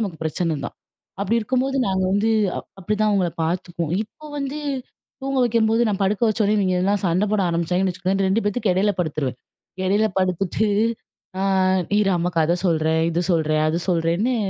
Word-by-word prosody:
நமக்கு 190 -7 -3
பிரச்சனை 160 +1 -1
தான். - - -6 0.5
அப்படி 205 +3 +1
இருக்கும்போது 260 +4 0
நாங்க 190 -1 0
வந்து, 210 +3 +2 0.3
அ - - -2 0.2
அப்டிதான் 210 +3 +1
அவங்கள 185 -4 +1
பாத்துக்குவோம். 170 -1 -2
இப்ப 300 +8 -14
வந்து, 275 +1 -3 0.6
தூங்க 270 0 -1
வைக்கும்போது 225 0 +2
நான் 205 -1 -2
படுக்க 195 +4 0
வச்ச 215 +1 -2
உடனே 210 +1 +2
இவிங்கெல்லாம் 190 +1 +1
சண்ட 180 +4 +2
போட 215 -2 +2
ஆரம்பிச்சாங்கன்னு 180 +3 0
வச்சுக்கோங்க, 185 +2 -1
இந்த 195 - +2
2 210 +4 +1
பேத்து 205 0 0
எடையில 200 +3 +2
படுத்துருவேன். 145 -6 -2 0.5
இடையில 205 +3 +3
படுத்துட்டு, 185 +3 0 0.7
ஆ - - 0 0.6
இரு 200 -2 +2
அம்மா 175 +1 0
கத 165 +2 +3
சொல்றேன், 160 -1 +2
இது 170 +1 0
சொல்றேன், 155 -2 +1
அது 165 +2 -1
சொல்றேன்னு, 175 +8 +1
190 Hz, 165 wpm, -22 LUFS, 170-215 Hz, 0.7 s, இடையில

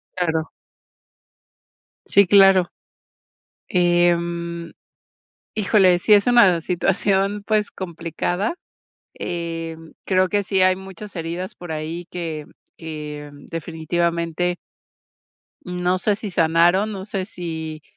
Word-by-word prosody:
Claro. 160 -3 -1 1.5
Sí, 200 - +5
claro. 195 -2 +6 1.0
Em, 170 -1 +1 0.8
híjole, 195 -4 +4
sí 210 +4 +5
es 200 -1 +4
una 205 -9 +5
situación, 195 +3 0
pues, 215 -1 +1
complicada. 175 - -3 0.6
Em, 165 -2 -5
creo 185 -1 +3
que 205 -1 +1
sí 190 0 +1
hay 185 0 +5
muchas 190 +2 -10
heridas 170 +2 -4
por 175 -2 -8
ahí 160 +3 -4
que 165 -4 -5 0.3
que 150 -2 -7 0.2
definitivamente 170 +1 -1 1.1
no 180 +1 -1
sé 205 +2 +1
si 205 0 -6
sanaron, 175 +5 +3
no 190 -1 -6
sé 195 -3 -3
si, 160 -5 -6
175 Hz, 100 wpm, -22 LUFS, 165-190 Hz, 1.5 s, claro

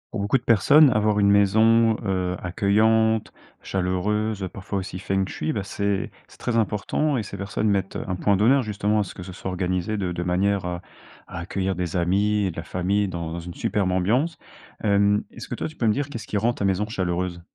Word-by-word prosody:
Pour 115 - -3
beaucoup 100 +6 +2
de 125 - -10
personnes, 140 +7 +6
avoir 105 -2 +2
une 100 0 +4
maison, 110 +3 +4
heu, 95 -2 -1
accueillante, 110 +4 +2 0.3
chaleureuse, 100 +3 -1
parfois 100 +1 -4
aussi 95 -1 -6
feng 95 0 0
shui, 80 -4 -3
bah, 100 - -2
c'est 100 0 -2 0.2
c'est - - -18
très 120 -2 -1
important 115 +7 0
et 115 - -1
ces 100 0 -8
personnes 100 +2 -1
mettent, 95 -1 -1
heu, - - -3
un 90 - 0
point 100 +2 +2
d'honneur 120 +8 +4
justement 105 -1 0
à - - +2
ce 95 - -9
que 90 - -8
ce 95 - -9
soit 95 +1 -6
organisé 90 +2 -1
de 95 -4 -2
de 90 0 -3
manière 95 +2 +1
à 90 -1 -4 0.5
à - - -7
accueillir 95 +2 -2
des 90 -1 -3
amis, 100 +3 +1
de - - -14
la 80 - -4
famille 95 +4 0
dans 85 -2 -4
une 85 +1 -8
superbe 100 +2 -1
ambiance. 120 - +1 0.5
Hem, 100 0 +3
est-ce - - -9
que - - -4
toi, - - -4
tu 155 - -16
peux 115 - +1
me 105 - +4
dire 145 +2 -2
qu'est-ce 115 -6 -7
qui - - -5
rend 110 +4 +2
ta 105 - -3
maison 95 +1 +1
chaleureuse? 90 -3 -2
100 Hz, 215 wpm, -24 LUFS, 90-110 Hz, 0.5 s, personnes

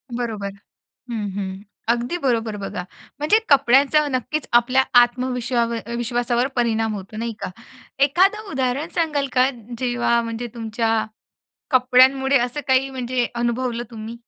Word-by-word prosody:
बरोबर 215 -5 -3 0.6
हं, 210 -3 -3
हं. 190 0 -5 0.3
अगदी 240 +8 -1
बरोबर 225 -4 0
बघा 195 -2 -5 0.4
म्हणजे 310 +9 +4
कपड्यांचा 280 +2 +4
नक्कीच 265 +3 -2
आपल्या 255 +2 +4 0.2
आत्मविश्वावर 240 -1 0
विश्वासावर 240 +1 0
परिणाम 225 -2 +1
होतो, 195 +2 -8
नाही 230 0 -3
का? - - -4 0.5
एखादं 390 +8 +2
उदाहरण 265 +4 -1
सांगाल 300 -4 0
का 255 +1 +4 0.3
जेव्हा 240 -1 +1
म्हणजे 230 +1 -4
तुमच्या, 225 -1 -1 0.7
कपड्यांमुळे 265 +1 +4
असं 245 +4 -2
काही 265 +1 +3
म्हणजे 250 -1 -1
अनुभवलं 240 0 -1
तुम्ही? 225 +1 -7
245 Hz, 120 wpm, -22 LUFS, 230-265 Hz, 0.7 s, म्हणजे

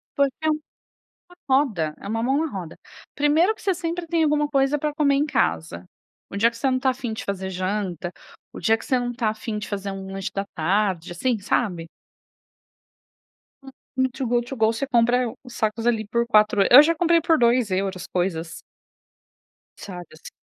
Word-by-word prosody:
porque 280 -2 +2
é 315 - +2
uma 305 0 -4 0.8
roda, 215 - +1
é - - -9
uma 225 +2 -2
mão 270 +3 +2
na 310 - -6
roda. 180 -5 -7 0.4
Primeiro 310 +8 +3
que - - -17
você 390 -2 +1
sempre 340 0 -4
tem 330 -1 +1
alguma 295 -1 +2
coisa 275 0 +1
pra 300 +1 -2
comer 290 -2 +2
em 285 +2 +2
casa, 85 - -1 0.4
o 200 - -6
dia 230 +3 +4
que 235 - -13
você 270 +3 +1
não 255 - +1
tá 260 0 +2
a - - -5
fim 245 -3 -5
de 220 - -6
fazer 190 -1 -3
janta, 185 -2 -3 0.4
o - - -8
dia 220 +6 +3
que - - -11
você 255 - +2
não 245 0 -3
tá 230 -2 0
a 215 - -2
fim 220 0 -5
de 210 - -6
fazer 200 -1 -3
um 195 0 -7
lanche 195 0 -4
da 195 0 -2
tarde, 185 0 0
assim, 235 +7 0
sabe? 185 -5 -1 1.7
Hum, 270 - -11 0.2
no 260 0 +2
Too 265 0 -4
Good 240 0 0
To 270 - -5
Go 220 -2 +3
você 230 +5 -3
compra 240 -1 +2
os 250 -2 -12
sacos 220 +1 -1
ali 220 -2 +1
por 235 +2 0
4 215 -3 +4
e, - - +4
eu 260 - +12
já 335 +2 +2
comprei 335 0 +3
por 325 -1 +3
2€ 200 -6 +1
coisas. 175 -3 -2 1.2
Sabe 180 -3 -8
assim. 155 - -12
230 Hz, 205 wpm, -23 LUFS, 195-275 Hz, 1.7 s, eu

